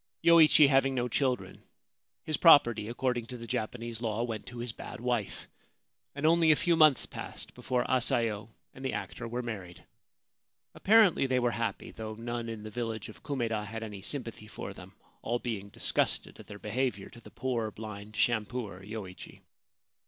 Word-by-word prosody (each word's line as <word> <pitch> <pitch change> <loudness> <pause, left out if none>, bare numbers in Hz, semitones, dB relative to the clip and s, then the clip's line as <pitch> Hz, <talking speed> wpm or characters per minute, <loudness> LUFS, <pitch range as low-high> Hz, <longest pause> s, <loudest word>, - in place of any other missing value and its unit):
Yoichi 160 -3 +7
having 135 -1 +3
no 125 -1 0
children, 125 -6 -1 0.6
his 155 - -1
property, 120 -10 +6
according 120 0 -1
to 125 - -7
the 115 - -8
Japanese 115 +1 -3
law, 115 -1 -1
went 115 -3 -4
to 120 - -9
his 120 0 -3
bad - - -9
wife, 115 -7 -2 0.7
and 145 +1 -2
only 165 0 +5
a 155 - +7
few 170 +2 +2
months 155 -5 +5
passed - - -8
before 125 -1 -1
Asayo 115 -4 0 0.2
and 130 - -11
the 130 - -1
actor 120 - -5
were 120 +2 -3
married. 95 -7 -7 0.9
Apparently 205 -9 +5
they 130 -1 +1
were 120 -1 +2
happy, 115 -4 -3
though 110 -1 -6
none 120 +1 -4
in 110 -2 -6
the 110 - -7
village 115 -2 -4
of 110 - -13
Kumeda 115 -7 -2
had 115 +2 -6
any 105 -3 -7
sympathy 115 -2 -5
for - - -7
them, - - -13 0.3
all 120 +2 -1
being 110 -5 -4
disgusted - - 0
at - - -12
their 105 - -9
behaviour 125 +5 -2
to 120 - -14
the - - -13
poor 120 -4 -2
blind 105 0 -9
shampooer 110 -4 -1
Yoichi. 100 -3 -8
120 Hz, 170 wpm, -30 LUFS, 110-130 Hz, 0.9 s, Yoichi